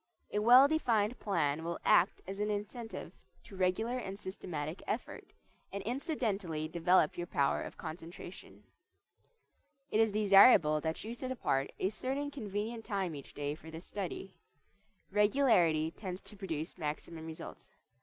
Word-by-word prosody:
A 210 - 0
well 245 +5 +8
defined 240 -7 +1
plan 160 -6 0
will 170 +1 -3
act - - +4
as 195 +1 -6
an 210 0 0
incentive 210 +3 -5 0.3
to 210 - -12
regular 205 +7 0
and 195 -4 -6
systematic 175 -4 -5
effort, 220 - -4 0.4
and 200 0 -4
incidentally 210 - -2
develop 170 0 +3
your 175 - -3
power 140 -3 +1
of - - -7
concentration. 170 +2 -9 1.3
It 215 - +2
is 225 -1 +4
desirable 195 -6 +6
that 160 +1 -3
you 225 +2 -5
set 255 +2 -5
apart 135 - 0
a 190 - +1
certain 270 +6 -3
convenient 225 -2 -4
time 195 -6 -2
each 140 -2 -10
day 145 0 -2
for 160 +1 -11
this 160 +2 -9
study. 190 -1 -5 0.8
Regularity 200 - +3
tends 185 0 -6
to 210 - -12
produce 170 -4 -5
maximum 160 +1 -5
results. 160 -1 -9
195 Hz, 145 wpm, -33 LUFS, 160-220 Hz, 1.3 s, well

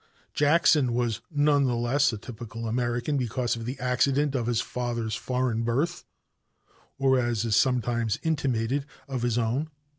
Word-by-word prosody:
Jackson 145 -4 +4
was 120 -2 -1
none 145 -2 +3
the 125 -2 +1
less 120 +4 +2
a 110 - -4
typical 115 +1 -7
American 120 +4 -1
because 120 -1 -1
of 115 -1 -6
the 130 +2 -5
accident 135 +3 +1
of 120 -4 -1
his 120 -2 +1
father's 120 -3 -3
foreign 125 -2 -1
birth, 140 +10 -1 0.9
or, 135 -1 +3
as 120 -2 0
is 110 -3 +1
sometimes 120 -3 +1
intimated, 140 -3 0 0.2
of 130 -3 -3
his 120 -1 0
own. 120 +7 0
125 Hz, 150 wpm, -27 LUFS, 115-140 Hz, 0.9 s, Jackson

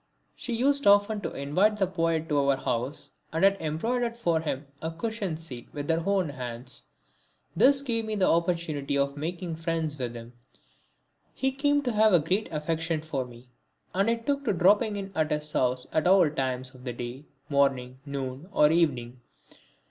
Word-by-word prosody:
She 240 - -4
used 280 +3 +2
often 205 +1 +5
to - - -3
invite 185 +10 +2
the 195 - +2
poet 165 -3 0
to 145 -2 +2
our 140 -1 +3
house 130 +3 -3 0.2
and 160 +3 -1
had 195 0 +6
embroidered 230 +10 -1
for 170 -8 +1
him 150 -2 -3 0.2
a 160 - -2
cushion 195 -1 -3
seat 135 -7 -9
with 145 -1 -5
her 165 +1 +1
own 195 -5 +2
hands. 125 -2 -6 0.7
This 275 0 +5
gave 230 -4 -1
me 215 0 -2
the 195 -3 +2
opportunity 165 -5 0
of 140 0 0
making 170 +2 -4
friends 165 -2 -1
with 120 -2 -3
him. 115 +1 -9 1.0
He 265 0 +1
came 285 +1 +1
to 250 - 0
have 215 -1 +4
a 175 - +7
great 180 +8 -1
affection 160 +1 -1
for 140 -5 -2
me, 120 0 -14 0.4
and 195 +4 +2
I 230 - +3
took 280 +5 -2
to - - +2
dropping 205 +4 +4
in 195 -1 -5
at 155 -2 0
his 150 0 -2
house 125 -1 +1
at 155 +2 +2
all 185 -2 +6
times 130 -2 -2
of 125 -1 -15
the 125 -2 -4
day, 120 +4 -7 0.2
morning, 135 -3 +1
noon 140 +3 -5
or 150 -5 +5
evening. 130 -7 0
160 Hz, 180 wpm, -28 LUFS, 140-200 Hz, 1.0 s, a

